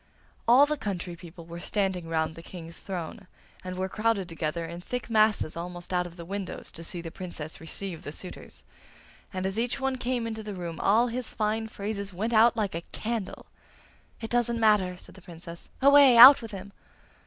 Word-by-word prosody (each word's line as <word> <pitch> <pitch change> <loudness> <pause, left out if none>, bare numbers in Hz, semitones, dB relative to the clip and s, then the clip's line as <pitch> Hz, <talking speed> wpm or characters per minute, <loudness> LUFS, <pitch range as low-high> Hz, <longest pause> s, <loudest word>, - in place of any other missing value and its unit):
All 255 +5 +7
the 300 +1 -2
country 180 -7 -4
people 170 0 -12
were 170 +1 -8
standing 190 -3 -2
round 160 -1 -1
the 165 - -11
King's 165 -1 -10
throne, 180 0 -6 0.4
and 185 0 -6
were 190 0 -1
crowded 215 -1 0
together 165 0 -3
in 170 +1 -7
thick 245 +4 -5
masses 215 -7 +3
almost 175 +1 -6
out 180 0 +1
of 170 - -13
the 170 -1 -9
windows 195 +1 -6
to 165 - -9
see 170 +1 -5
the 165 -1 -7
Princess 170 -5 -7
receive 170 +1 -6
the 145 - -7
suitors; 180 +4 -9 0.7
and 185 -1 -3
as 195 +3 -2
each 240 +3 0
one 270 -1 -1
came 245 -1 -1
into 220 -1 -4
the 210 -2 -6
room 170 -3 -6
all 220 +5 +4
his 245 +1 -3
fine 220 +1 -1
phrases 200 -2 -5
went 220 +6 -2
out 230 +2 +5
like 205 -3 -1
a 165 - -3
candle! 220 -4 -4 0.7
'It 225 - -6
doesn't 240 -1 +2
matter!' 205 -5 +3
said - - -13
the 190 - -15
Princess. 170 -1 -11
'Away! 280 -3 +8
out 255 +4 +11
with 225 - -7
him! 195 -1 -8
195 Hz, 195 wpm, -27 LUFS, 170-225 Hz, 0.7 s, out